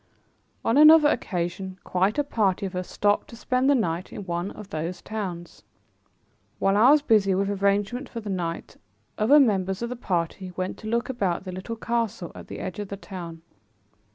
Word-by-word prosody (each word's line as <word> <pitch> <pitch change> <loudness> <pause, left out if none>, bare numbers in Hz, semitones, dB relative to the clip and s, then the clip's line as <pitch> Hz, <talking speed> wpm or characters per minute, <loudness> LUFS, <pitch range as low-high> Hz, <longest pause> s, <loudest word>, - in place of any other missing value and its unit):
On 230 - +3
another 305 0 +8
occasion, 185 -1 -3
quite 190 +6 0
a 290 - +3
party 205 -8 0
of 190 -1 -5
us 180 0 -4
stopped 205 0 +1
to - - -11
spend 255 +3 +1
the 285 - +5
night 175 -6 -1
in 200 - -7
one 175 +1 -2
of 205 -1 -11
these 170 +2 -4
towns. 185 -6 -6 1.0
While 195 0 +2
I 225 +5 +6
was 295 0 +5
busy 205 -7 +3
with 195 +1 0
arrangements 205 +6 +1
for 235 - -6
the 215 - -9
night 170 -3 -4 0.4
other 260 +8 +6
members 195 -5 +1
of 235 - -2
the 250 - -4
party 180 -4 -3
went 185 0 -3
to 215 - -8
look 235 +2 0
about 195 -10 -1
the 185 - -6
little 185 +5 -6
castle 230 -5 -2
at - - -11
the - - -7
edge 185 0 -5
of 205 - -4
the 200 - -6
town. 170 -5 -8
200 Hz, 190 wpm, -25 LUFS, 185-230 Hz, 1.0 s, another